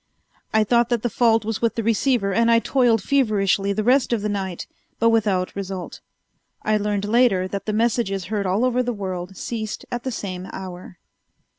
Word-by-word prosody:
I 220 0 +3
thought 235 +2 +2
that 240 -3 0
the 240 - -1
fault 225 -2 +3
was 225 -1 -3
with 230 -1 +1
the 230 - -2
receiver 225 -2 +1
and 230 +3 +3
I 230 - +6
toiled 230 -3 +2
feverishly 200 -7 +1
the 215 +2 -1
rest 255 +3 +3
of 225 -4 0
the 210 - -1
night, 190 -3 -3 0.3
but 230 0 +3
without 205 -5 +1
result. 190 -2 -6 0.6
I 215 0 +2
learned 205 -1 -1
later 210 -4 +3
that 200 +1 -5
the 215 - 0
messages 215 -4 0
heard 200 0 -2
all 200 +7 +1
over 250 0 +1
the 245 -1 -2
world 185 -1 -5
ceased 220 -3 -5
at 245 - -2
the 260 - -4
same 185 -5 -5
hour. 185 -1 -8
215 Hz, 190 wpm, -22 LUFS, 195-235 Hz, 0.6 s, I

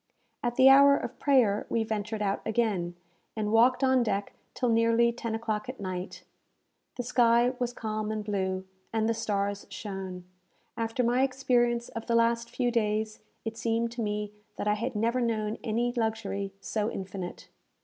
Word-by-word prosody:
At 240 0 -1
the 260 - +7
hour 280 +1 +8
of - - -6
prayer 245 -8 +3
we 230 - +1
ventured 215 0 -3
out 200 -1 0
again, 205 -6 0 0.4
and 210 -1 -1
walked 245 +4 +4
on 260 -1 +4
deck 205 -3 -1 0.2
till 250 - 0
nearly 230 +1 +4
ten 230 -1 -4
o'clock 225 0 -3
at 260 - -6
night. 185 -2 -5 0.7
The 245 - -3
sky 240 0 +4
was 245 -1 0
calm 215 -2 -3
and 215 -1 -3
blue, 190 -2 -1 0.3
and 220 -1 +1
the 230 - +2
stars 205 -2 -2
shone. 190 -3 -6 0.5
After 230 +2 -1
my 245 +2 +2
experience 245 -3 +1
of 230 - -7
the 235 - +2
last 230 0 +2
few 245 0 0
days, 215 -1 0 0.3
it 225 0 -4
seemed 230 0 0
to 240 0 -5
me 210 -1 -2 0.2
that - - -3
I 210 - +4
had 230 +3 -3
never 230 +4 +1
known 220 -2 -1
any 240 +1 0
luxury 220 -4 -2
so 215 +1 -1
infinite. 190 -3 -6
225 Hz, 170 wpm, -29 LUFS, 210-240 Hz, 0.7 s, hour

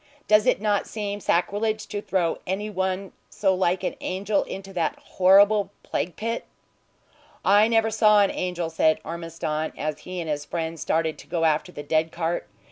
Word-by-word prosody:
Does 210 0 +5
it - - +3
not 205 -1 0
seem 205 -2 -4
sacrilege 210 +4 0
to 205 -1 -3
throw 185 -5 0
any 205 +3 -2
one 190 0 -2 0.2
so 195 -2 +1
like 185 0 +1
an - - -1
angel 195 +2 0
into 195 0 -8
that 170 -3 -1
horrible 200 +2 +4
plague 175 - -3
pit?" 230 +2 -3 1.0
"I 205 +2 +6
never 225 -1 +2
saw 210 -1 +5
an 195 - +1
angel," 175 -2 -3
said 160 -1 +3
Ormiston, 165 -2 -4
as 155 0 -3
he 185 0 -6
and 165 - -4
his 150 -1 -2
friend 165 +1 -4
started 160 0 0
to - - -13
go 165 -1 0
after 155 +3 +1
the 145 - -8
dead 155 +2 +1
cart. 170 -6 -2
185 Hz, 175 wpm, -25 LUFS, 165-205 Hz, 1.0 s, I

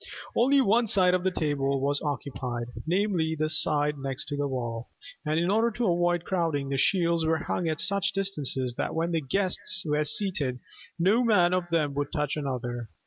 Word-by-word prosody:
Only 270 +3 +4
one 230 +1 +3
side 185 -3 +4
of 185 -1 +1
the 190 - +3
tables 140 -5 0
was 140 +1 0
occupied, 125 -5 -4 0.2
namely, 175 -3 +1
the 155 0 -1
side 150 -2 +1
next 135 +1 -3
the 145 0 -1
wall: 120 -3 -4 0.3
and 155 +1 0
in 175 +3 +1
order 225 +3 +3
to 230 -3 0
avoid 175 0 +1
crowding, 165 -7 -1
the 135 - -1
shields 170 0 +2
were 160 0 +2
hung 170 +1 -2
at 155 - -2
such 200 -1 +1
a - - -7
distance 195 -9 -2 0.2
that - - -2
when 165 +1 0
the 165 -1 0
guests 190 +5 0
were 150 0 +1
seated 150 -5 -1 0.4
"no 200 +8 +3
man 180 -6 +4
of 180 -1 -1
them 155 -4 +1
would 145 0 -2
touch 150 -2 -1
another." 125 -5 -4
160 Hz, 190 wpm, -27 LUFS, 140-185 Hz, 0.4 s, Only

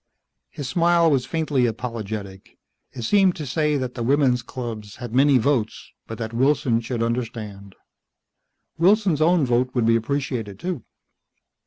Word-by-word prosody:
His 145 - -6
smile 170 +3 +3
was 130 -3 +1
faintly 145 -5 0
apologetic. 110 -4 -6 0.3
It 120 - -7
seemed 190 - +3
to 155 -5 -6
say 150 +2 0
that 130 -2 -3
the 120 - -6
women's 130 0 +2
clubs 115 -4 -7
had 120 -3 -8
many 135 +1 +5
votes, 120 -3 -1 0.2
but 115 - -7
that 110 0 -5
Wilson 130 -2 +2
should 115 0 -3
understand, 110 -5 -4 1.0
Wilson's 185 -3 +3
own 165 -1 +4
vote 125 +1 0
would 120 -3 +2
be 115 0 +4
appreciated 115 -4 -2
too. 175 - -4
125 Hz, 145 wpm, -23 LUFS, 115-145 Hz, 1.0 s, many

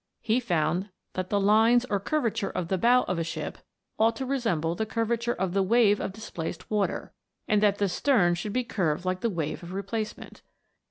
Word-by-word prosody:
He 230 +2 +2
found 175 -3 0 0.2
that 185 0 -3
the 205 - +2
lines 225 +4 +4
or 200 - 0
curvature 230 -3 -1
of 175 -2 -4
the 190 - 0
bow 245 +4 +5
of 180 -1 -2
a - - 0
ship 165 - -5 0.4
ought 225 +1 +4
to 265 - -4
re 275 +1 0
semble 165 -8 0
the 220 - -1
curvature 235 +1 -1
of 185 -1 -2
the 195 - +2
wave 210 +1 +4
of - - -3
displaced 185 -4 -7
water, 210 -2 -1 0.3
and 210 -1 +3
that 205 -1 +3
the 205 - +1
stern 195 -3 +3
should 175 +5 -3
be 255 - +1
curved 180 -7 -1
like 185 0 -1
the 230 - 0
wave 160 -6 -3
of 175 +1 -8
replacement. 205 +3 -5
205 Hz, 205 wpm, -27 LUFS, 180-230 Hz, 0.4 s, bow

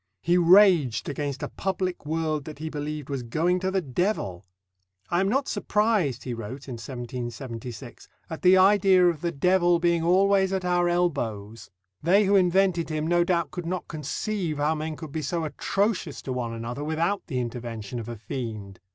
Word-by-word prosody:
He 175 - +3
raged 175 - +5
against 145 -1 -4
a - - -1
public 185 -4 -3
world 155 -2 -1
that 155 -2 -8
he 160 +1 -5
believed 150 -1 -5
was 140 -2 -3
going 165 +10 0
to 190 +1 -1
the 190 -1 0
devil. 130 - -2 0.6
"I 175 - +2
am 195 +1 +2
not 270 +5 +1
surprised," 205 - 0
he 125 - -4
wrote 120 +5 -7
in 130 - -5
1776, 120 -1 -7 0.2
"at 160 - -7
the 185 +1 +6
idea 190 -1 +5
of 160 -3 -3
the 170 - -1
devil 175 +3 +3
being 170 0 +2
always 190 +2 +3
at 190 -1 -1
our 175 -1 +2
elbows. 115 -12 -2 0.3
They 190 +6 +4
who 200 +1 +3
invented 185 -2 +3
him 155 -1 -2
no 175 +1 +3
doubt 170 -1 0
could 175 -2 -6
not 180 0 -3
conceive 165 +2 -3
how 150 +2 +1
men 155 0 -4
could 155 -2 -9
be 155 - -3
so 170 +2 -2
atrocious 190 +1 -1
to 130 - -3
one 120 -2 -3
another, 115 +5 -5
without 165 +6 -1
the 130 -7 -2
intervention 120 -2 -5
of 115 0 -7
a 120 - -5
fiend. 105 -3 -6
160 Hz, 180 wpm, -26 LUFS, 130-180 Hz, 0.6 s, the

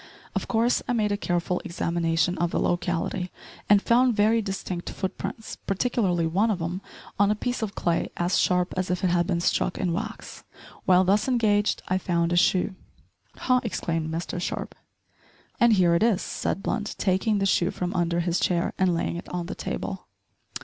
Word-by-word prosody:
Of - - -2
course 235 +1 +2
I - - +1
made 215 -3 +1
a - - +2
careful 175 -2 -1
examination 170 -1 0
of 175 0 +1
the - - -1
locality, 175 +1 -1 0.4
and 205 -1 +6
found 245 0 +4
very 220 +2 +3
distinct 190 -3 -4
foot 190 -1 -4
prints, 225 - -6
particularly 195 -5 +1
one 195 +8 +2
of 200 -4 0
'em 175 +3 -3 0.4
on 205 0 +5
a 210 - +2
piece 245 +3 -3
of 210 -3 -3
clay 170 -1 0
as 175 +2 +1
sharp 180 0 +2
as 185 0 -1
if 180 +1 -1
it 180 - +3
had 175 -1 +2
been 175 -3 0
struck 175 - +1
in 180 -3 0
wax. 220 +5 -6 0.4
While 185 0 +5
thus 200 +6 +2
engaged 215 -5 +2
I 185 +1 +1
found 170 -2 0
a - - +2
shoe 180 +2 +3 0.3
" - - -38
"Ha!" 255 0 +3
exclaimed 165 -7 -2
Mr 170 +2 -3
Sharp. - - -4 0.9
"And 235 -2 +6
here 180 -4 +4
it 170 - +2
is," 220 -4 +2
said 195 - -3
Blunt 210 0 -2
taking 195 +3 +1
the 195 - +1
shoe 180 -2 +2
from 180 0 -3
under 175 -1 +1
his 170 0 0
chair 170 -2 +1
and 185 -2 +3
laying 170 - -2
it 175 - -8
on 180 -1 -3
the 175 - -5
table. - - -5
185 Hz, 190 wpm, -26 LUFS, 175-210 Hz, 0.9 s, and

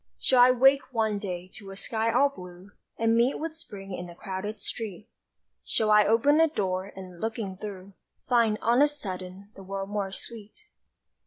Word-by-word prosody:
Shall 255 -2 +4
I 250 - +8
wake 260 +1 +4
one 220 -2 +1
day 180 -3 -5
to 200 -2 -9
a 195 - -8
sky 225 +3 -1
all 270 +5 +4
blue 180 -5 -12 0.3
And 225 0 +2
meet 235 +3 +3
with 320 0 -4
Spring 200 - -8
in 180 -1 -6
a 170 - -11
crowded 200 +3 -5
street? 210 -1 -6 0.6
Shall 215 -1 +1
I 210 -1 +6
open 280 +8 +4
a 325 - +6
door 190 -10 -2
and, 185 -2 -10
looking 225 -4 -3
through, 195 -1 -8 0.3
Find, 230 -4 +3
on 240 +4 +4
a 295 - +7
sudden, 195 -7 -6
the - - -11
world 195 +1 -5
more 200 -2 -2
sweet? 225 - -9
210 Hz, 180 wpm, -27 LUFS, 190-240 Hz, 0.6 s, I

